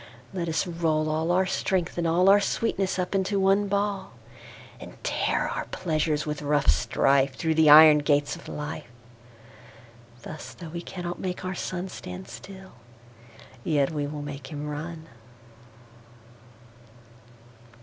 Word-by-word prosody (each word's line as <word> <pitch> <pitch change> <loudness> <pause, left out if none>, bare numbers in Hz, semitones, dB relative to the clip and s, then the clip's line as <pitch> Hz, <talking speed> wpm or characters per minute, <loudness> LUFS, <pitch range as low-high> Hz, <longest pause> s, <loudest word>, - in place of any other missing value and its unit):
Let 175 -3 -3
us 160 -1 0
roll 165 -3 0
all 160 +2 -1
our 185 +2 +3
Strength, 185 -2 -1
and 170 - 0
allOur 185 +5 +5
sweetness, 195 -2 -1
up 180 +1 -2
into 195 +1 0
one 195 +1 +3
Ball:And 190 - -6
tear - - 0
our - - -3
Pleasures 155 -1 -1
with 150 0 -4
rough 145 - +3
strife, 135 - +2
Thorough 160 +2 0
the 160 -1 +5
Iron 155 0 +9
gates 145 0 +1
of - - -13
Life.Thus, 120 0 -11
though 170 -3 -9
we 170 +2 -5
cannot 175 -1 -6
make 185 0 -4
our 185 - -2
SunStand 175 - -6
still, 190 +11 -11 0.9
yet 145 -3 +1
we 145 -2 -2
will 145 0 -6
make 140 -2 -7
him 150 +1 -6
run. 160 +2 -6
155 Hz, 130 wpm, -26 LUFS, 140-180 Hz, 0.9 s, Iron